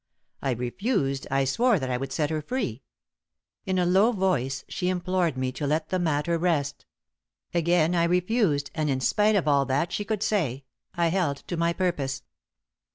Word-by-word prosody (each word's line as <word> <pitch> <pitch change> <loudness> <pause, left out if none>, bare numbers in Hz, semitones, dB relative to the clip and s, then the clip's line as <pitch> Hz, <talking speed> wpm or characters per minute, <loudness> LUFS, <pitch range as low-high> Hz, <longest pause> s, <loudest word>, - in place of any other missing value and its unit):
I 135 - -1
refused 135 - -1
I 135 0 +2
swore 235 - +3
that 130 -4 -3
I - - +1
would 135 +1 -5
set 150 +1 -1
her 155 -1 -1
free. 150 - -3 0.9
In 190 -1 0
a 180 - +2
low 195 +6 +4
voice 135 - -1
she 180 -1 -2
implored 180 -4 0
me 130 0 -1
to 140 +3 -4
let 155 +2 0
the 185 - 0
matter 165 0 0
rest; 160 -5 -1 0.7
again 170 0 +2
I 170 -1 +3
refused, 180 -4 +1
and 155 -2 -1
in 130 -1 0
spite 210 +10 +2
of 185 -6 +1
all 140 -2 +3
that 140 +6 0
she 205 - -2
could 215 0 -2
say, 140 - -1 0.3
I 170 -1 +2
held 165 -6 0
to 175 - -4
my 170 0 +1
purpose. 140 -7 -2
165 Hz, 180 wpm, -26 LUFS, 140-185 Hz, 0.9 s, low